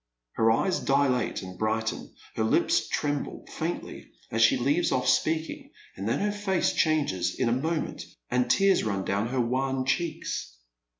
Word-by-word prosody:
Her 115 Hz, -, +2 dB
eyes 180 Hz, +12 st, +2 dB
dilate 135 Hz, -6 st, +1 dB
and 90 Hz, -1 st, -9 dB
brighten, 110 Hz, 0 st, -2 dB, 0.2 s
her 110 Hz, -, -1 dB
lips 110 Hz, -, +2 dB
tremble 145 Hz, -1 st, -2 dB
faintly -, -, -5 dB, 0.2 s
as 115 Hz, -, 0 dB
she 110 Hz, -, +5 dB
leaves 145 Hz, +8 st, +1 dB
off 125 Hz, 0 st, 0 dB
speaking, 160 Hz, 0 st, 0 dB, 0.3 s
and 100 Hz, +3 st, -3 dB
then -, -, +1 dB
her 205 Hz, 0 st, +1 dB
face 205 Hz, -3 st, 0 dB
changes 145 Hz, -, +1 dB
in 130 Hz, -, +2 dB
a -, -, +1 dB
moment, 155 Hz, +6 st, -2 dB, 0.3 s
and 125 Hz, 0 st, +1 dB
tears 195 Hz, +7 st, +4 dB
run 100 Hz, -3 st, -2 dB
down 100 Hz, +3 st, 0 dB
her 130 Hz, +2 st, -2 dB
wan 130 Hz, +2 st, 0 dB
cheeks. 155 Hz, -, -2 dB
130 Hz, 160 wpm, -27 LUFS, 110-155 Hz, 0.3 s, she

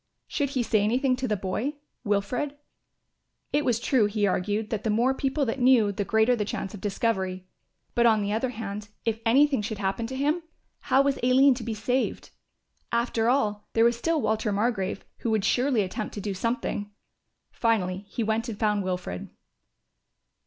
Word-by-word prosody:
Should 285 Hz, -3 st, -1 dB
he 245 Hz, -, +2 dB
say 220 Hz, -2 st, +2 dB
anything 255 Hz, +5 st, +2 dB
to 260 Hz, 0 st, -2 dB
the 210 Hz, -, 0 dB
boy, 215 Hz, +10 st, -2 dB, 0.3 s
Wilfred? 240 Hz, +7 st, -1 dB, 1.0 s
It 295 Hz, +1 st, +2 dB
was 240 Hz, -4 st, +1 dB
true, 245 Hz, -3 st, +3 dB
he 205 Hz, 0 st, 0 dB
argued, 205 Hz, +3 st, -1 dB
that 215 Hz, -2 st, -2 dB
the 220 Hz, -, 0 dB
more 235 Hz, +5 st, +3 dB
people 270 Hz, +2 st, 0 dB
that 245 Hz, +3 st, -2 dB
knew, 245 Hz, -5 st, +5 dB
the 200 Hz, +1 st, -2 dB
greater 220 Hz, +4 st, +3 dB
the 215 Hz, -, -1 dB
chance 200 Hz, -1 st, -4 dB
of 205 Hz, -, -9 dB
discovery. 190 Hz, -3 st, -1 dB, 0.5 s
But 235 Hz, 0 st, +4 dB
on 215 Hz, -2 st, +3 dB
the 200 Hz, +1 st, -1 dB
other 230 Hz, +4 st, 0 dB
hand, 210 Hz, -3 st, -6 dB, 0.2 s
if 225 Hz, -1 st, 0 dB
anything 275 Hz, +1 st, +4 dB
should 215 Hz, +1 st, -4 dB
happen 200 Hz, +3 st, -2 dB
to 260 Hz, -, -6 dB
him, 295 Hz, +6 st, +1 dB, 0.4 s
how 270 Hz, -, +3 dB
was 275 Hz, -1 st, 0 dB
Aline 260 Hz, +3 st, +5 dB
to 245 Hz, -1 st, -6 dB
be 225 Hz, -1 st, -3 dB
saved? 250 Hz, +5 st, -1 dB, 0.6 s
After 235 Hz, -1 st, +1 dB
all 210 Hz, -6 st, 0 dB
there 225 Hz, 0 st, +4 dB
was 235 Hz, 0 st, +4 dB
still 325 Hz, +7 st, 0 dB
Walter 220 Hz, -4 st, 0 dB
Margrove, 200 Hz, -2 st, -1 dB, 0.2 s
who 235 Hz, -, -2 dB
would 220 Hz, -3 st, +1 dB
surely 250 Hz, -4 st, +2 dB
attempt 210 Hz, +4 st, -5 dB
to -, -, -4 dB
do 200 Hz, 0 st, -3 dB
something. 205 Hz, 0 st, -2 dB, 0.6 s
Finally 200 Hz, -4 st, 0 dB
he 230 Hz, -, -2 dB
went 220 Hz, +2 st, -1 dB
and 215 Hz, -, -5 dB
found 210 Hz, -2 st, +1 dB
Wilfred. 180 Hz, -, -4 dB
225 Hz, 180 wpm, -26 LUFS, 205-255 Hz, 1.0 s, knew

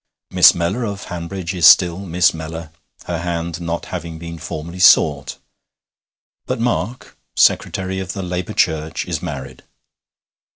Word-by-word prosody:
Miss -, -, +7 dB
Mellor 85 Hz, +8 st, -1 dB
of 100 Hz, -3 st, -4 dB
Hanbridge 90 Hz, +1 st, -5 dB
is 90 Hz, -2 st, +5 dB
still 90 Hz, -1 st, +6 dB
Miss 90 Hz, -2 st, +2 dB
Mellor, 80 Hz, 0 st, -7 dB, 0.3 s
her 85 Hz, -2 st, -3 dB
hand 85 Hz, 0 st, -4 dB
not 85 Hz, 0 st, -3 dB
having 85 Hz, -2 st, -5 dB
been 85 Hz, 0 st, -8 dB
formally 80 Hz, +4 st, -7 dB
sought. 95 Hz, -, +4 dB, 1.1 s
But -, -, -2 dB
Mark, 120 Hz, +1 st, -3 dB, 0.2 s
secretary 95 Hz, 0 st, +1 dB
of 95 Hz, -1 st, -5 dB
the 95 Hz, -, -5 dB
Labour 90 Hz, 0 st, -4 dB
Church, 80 Hz, 0 st, 0 dB
is -, -, -3 dB
married. 65 Hz, -1 st, -7 dB
85 Hz, 135 wpm, -19 LUFS, 85-95 Hz, 1.1 s, Miss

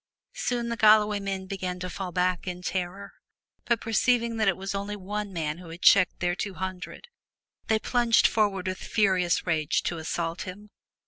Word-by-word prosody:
Soon 240 Hz, -1 st, -2 dB
the 235 Hz, -, -3 dB
Galloway 210 Hz, -1 st, +5 dB
men 195 Hz, -1 st, -4 dB
began 185 Hz, -2 st, -4 dB
to 180 Hz, -, -4 dB
fall 185 Hz, 0 st, -5 dB
back 180 Hz, +1 st, 0 dB
in 180 Hz, 0 st, -5 dB
terror, 190 Hz, +2 st, -4 dB, 0.5 s
but 235 Hz, -2 st, +1 dB
perceiving 230 Hz, +1 st, +1 dB
that 215 Hz, -2 st, +1 dB
it 190 Hz, -, +2 dB
was 195 Hz, +1 st, -4 dB
only 200 Hz, +1 st, -3 dB
one 205 Hz, +1 st, -4 dB
man 160 Hz, -2 st, -3 dB
who 180 Hz, -2 st, -11 dB
had 170 Hz, +2 st, -10 dB
checked 185 Hz, -2 st, +5 dB
their 175 Hz, -1 st, +1 dB
two 195 Hz, +1 st, -4 dB
hundred, 185 Hz, -1 st, -6 dB, 0.6 s
they 220 Hz, -, +3 dB
plunged 235 Hz, +1 st, +3 dB
forward 205 Hz, -4 st, +2 dB
with 185 Hz, 0 st, -3 dB
furious 185 Hz, -5 st, +1 dB
rage 160 Hz, -3 st, 0 dB
to 170 Hz, -, -2 dB
assault 165 Hz, +1 st, -3 dB
him. 205 Hz, +3 st, -8 dB
190 Hz, 180 wpm, -27 LUFS, 180-210 Hz, 0.6 s, Galloway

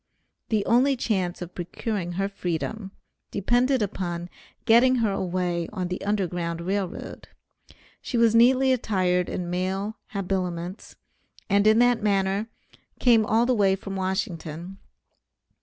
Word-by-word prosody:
The 215 Hz, -3 st, +1 dB
only 260 Hz, +4 st, +4 dB
chance 185 Hz, -7 st, -1 dB
of 175 Hz, +1 st, -10 dB
procuring 175 Hz, 0 st, -4 dB
her 195 Hz, +2 st, -1 dB
freedom, 195 Hz, +2 st, -4 dB, 0.4 s
depended 245 Hz, +4 st, +1 dB
upon 175 Hz, -3 st, -4 dB, 0.3 s
getting 245 Hz, +2 st, +5 dB
her 230 Hz, -4 st, +1 dB
away 180 Hz, -2 st, -2 dB
on 185 Hz, -4 st, -3 dB
the 180 Hz, -, -4 dB
Underground 175 Hz, -5 st, -1 dB
Rail 190 Hz, +2 st, -1 dB
Road. -, -, -9 dB, 0.7 s
She 245 Hz, -, -3 dB
was 230 Hz, -1 st, +4 dB
neatly 260 Hz, +3 st, +5 dB
attired 185 Hz, -7 st, 0 dB
in 175 Hz, -1 st, -4 dB
male 190 Hz, +4 st, -2 dB
habiliments, 185 Hz, -2 st, -4 dB, 0.6 s
and 200 Hz, +1 st, +4 dB
in 215 Hz, +1 st, +6 dB
that 245 Hz, -1 st, +4 dB
manner 200 Hz, 0 st, +1 dB, 0.5 s
came 230 Hz, -4 st, +4 dB
all 225 Hz, +2 st, +3 dB
the 255 Hz, -, +2 dB
way 195 Hz, -4 st, +3 dB
from 195 Hz, 0 st, -7 dB
Washington. 185 Hz, -2 st, -4 dB
195 Hz, 130 wpm, -25 LUFS, 180-225 Hz, 0.7 s, in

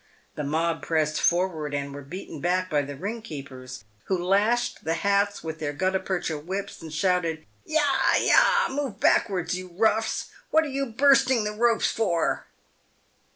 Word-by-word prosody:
The 150 Hz, -, -4 dB
mob 165 Hz, +3 st, 0 dB
pressed 155 Hz, -2 st, 0 dB
forward 170 Hz, -5 st, +1 dB
and 140 Hz, 0 st, -4 dB
were 145 Hz, -, -7 dB
beaten 155 Hz, +1 st, -8 dB
back 185 Hz, +1 st, 0 dB
by 145 Hz, -1 st, +3 dB
the 145 Hz, 0 st, -6 dB
ring 205 Hz, +10 st, -5 dB
keepers, 130 Hz, -, -9 dB, 0.2 s
who 190 Hz, -, 0 dB
lashed 200 Hz, +7 st, +1 dB
the 165 Hz, +1 st, 0 dB
hats 200 Hz, +3 st, +1 dB
with 160 Hz, -1 st, -5 dB
their 145 Hz, -2 st, -3 dB
gutta 185 Hz, +5 st, 0 dB
percha 175 Hz, -5 st, -2 dB
whips, 195 Hz, +6 st, -5 dB
and 160 Hz, -1 st, -8 dB
shouted, 165 Hz, -1 st, 0 dB
" -, -, -38 dB
Yah! 295 Hz, -3 st, +2 dB
yah! -, -, +4 dB
move 270 Hz, -7 st, -3 dB
back'ards, 185 Hz, -6 st, +2 dB
you 185 Hz, 0 st, -4 dB
roughs! 220 Hz, +4 st, 0 dB, 0.2 s
what 320 Hz, +1 st, +4 dB
are 305 Hz, -, -4 dB
you 275 Hz, 0 st, -2 dB
bursting 260 Hz, 0 st, +4 dB
the 210 Hz, -, -2 dB
ropes 230 Hz, +1 st, +2 dB
for 175 Hz, -7 st, 0 dB
185 Hz, 165 wpm, -26 LUFS, 155-220 Hz, 0.2 s, yah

